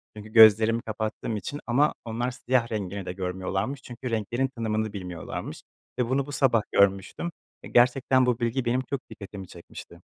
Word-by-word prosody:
çünkü 105 0 -10
gözlerimi 110 +1 +7
kapattığım 110 0 -3
için 145 +7 -5
ama 140 +6 +3
onlar 120 +2 -2
siyah 125 -1 0
rengini 100 -2 -4
de 90 - -4
görmüyorlarmış 95 +7 -3
çünkü 125 0 -7
renklerin 120 +4 0
tanımını 110 -2 -2
bilmiyorlarmış 90 -4 -6 0.4
ve 120 -1 +1
bunu 135 +1 +1
bu 145 - -8
sabah 130 -5 +3
görmüştüm 100 - +2 0.3
ve - - -8
gerçekten 130 +1 +4
bu 125 -1 +1
bilgi 120 +2 -1
benim 125 +2 +1
çok 140 - -1
dikkatimi 100 -3 -9
çekmişti. 85 -1 -12
115 Hz, 160 wpm, -26 LUFS, 100-125 Hz, 0.4 s, gözlerimi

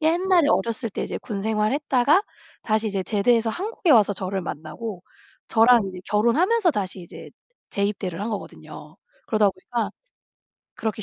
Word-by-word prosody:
옛날에 340 +1 +3
어렸을 230 0 0
때 - - -4
이제 - - -4
군 205 -4 -5
생활 215 +1 +1
했다가 285 +5 +3 0.4
다시 220 0 0
이제 195 -2 -2
제대해서 225 +3 +2
한국에 375 - -2
와서 210 -5 +6
저를 190 0 -3
만나고 175 +5 -6 0.5
저랑 230 +1 +5
이제 185 -1 -8
결혼하면서 335 - +3
다시 195 -6 -3
이제 170 - -11 0.4
재입대를 200 -3 -2
한 215 - -2
거거든요. 210 - -8 0.3
그러다 215 -2 +3
보니까 210 +3 -4 0.9
그렇게 220 -1 -3
220 Hz, 350 characters per minute, -24 LUFS, 200-255 Hz, 0.9 s, 와서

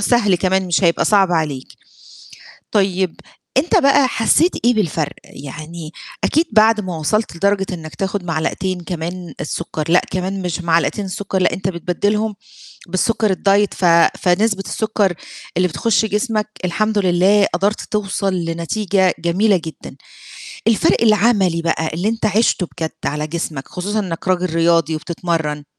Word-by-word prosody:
سهل 205 -3 +3
كمان 190 +1 +1
مش 175 +1 +1
هيبقى 170 - +3
صعب 195 -4 +3
عليك، 150 -5 -2 1.0
طيب 190 -3 0 0.4
أنت 305 +6 +3
بقى 275 -1 +4
حسّيت 250 - +3
إيه 245 - +4
بالفرق؟ 165 -8 -1
يعني 155 +3 -9 0.3
أكيد 320 +3 +3
بعد 220 0 +5
ما 185 -4 -5
وصلت 190 +5 -1
لدرجة 195 +2 +1
إنك 160 -3 -7
تاخد 195 -1 -3
معلقتين 175 +3 -2
كمان 175 +1 -6
السُكّر، 155 0 -4
لأ 175 +2 +5
كمان 190 +1 -3
مش 180 0 -3
معلقتين 170 +5 +1
السُكّر 190 +1 -3
لأ - - +2
أنت 190 0 -3
بتبدلهم 205 +5 -1 0.5
بالسُكّر 205 +3 +1
الdiet 200 +1 +3
ف 185 - -2 0.4
فنسبة 195 +2 +2
السُكّر 215 -4 0 0.4
اللي 180 0 +3
بتخش 220 +5 +1
جسمك 215 0 -1 0.2
الحمد 215 +5 0
لله 195 +2 +4
قدرت 200 +4 0
توصل 195 -2 -2
لنتيجة 180 +3 0
جميلة 185 +4 +2
جدًا، 160 - -9 0.7
الفرق 225 0 +3
العملي 205 -6 +3
بقى 160 -1 -1
اللي 180 +6 -1
أنت 225 -1 -1
عِشته 210 -3 +2
بجد 160 -2 -2
على 150 +1 -2
جسمك، 155 -4 -5
خصوصًا 205 +4 -3
إنك 185 -3 -4
راجل 180 -2 0
رياضي 165 -1 +2
وبتتمرّن 155 -2 -3
185 Hz, 140 wpm, -18 LUFS, 170-210 Hz, 1.0 s, بعد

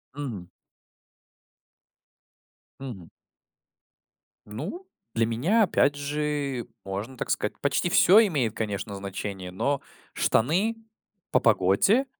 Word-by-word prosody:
Мгм. 120 -11 -5 2.3
Мгм. 115 -11 -8 1.4
Ну, 170 - -6 0.3
для 115 0 +2
меня 150 - +2
опять 145 -6 +3
же, 145 -3 -2 0.2
можно 100 +7 -5
так - - -4
сказать, 105 - -1
почти 140 +5 +1
всё 205 +5 +7
имеет, 135 - 0
конечно, 105 -2 -3
значение, 95 -1 -5
но 140 +9 -1 0.3
штаны- 180 - +2 0.6
по - - +4
погоде, 145 - +4
130 Hz, 95 wpm, -26 LUFS, 105-150 Hz, 2.3 s, всё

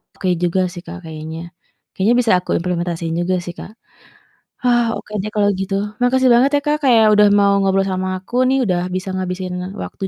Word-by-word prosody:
oke 190 - -4 0.2
juga 175 +2 +1
sih, 175 - -8
Kak, - - -8
kayaknya, 160 0 -7 0.5
kayaknya 205 +5 +2
bisa 240 -3 +2
aku 180 - -17
implementasiin 170 -2 -2
juga 185 +1 0
sih, 175 - -6
Kak. - - -9 0.9
Hah, 240 -1 +3
oke - - -9
deh 210 - -4
kalau 205 -1 +2
gitu, 195 0 -3 0.3
makasih 255 0 +3
banget 245 +4 +4
ya, - - +1
Kak, 300 0 +1
kayak 235 -4 +5
udah 210 0 +6
mau 200 0 +4
ngobrol 195 0 +2
sama 185 0 -2
aku 185 +5 -12
nih, 265 +1 +2
udah 180 -5 0
bisa 185 +1 -3
ngabisin 185 0 -4 0.2
waktu 195 - -6
190 Hz, 190 wpm, -18 LUFS, 180-230 Hz, 0.9 s, udah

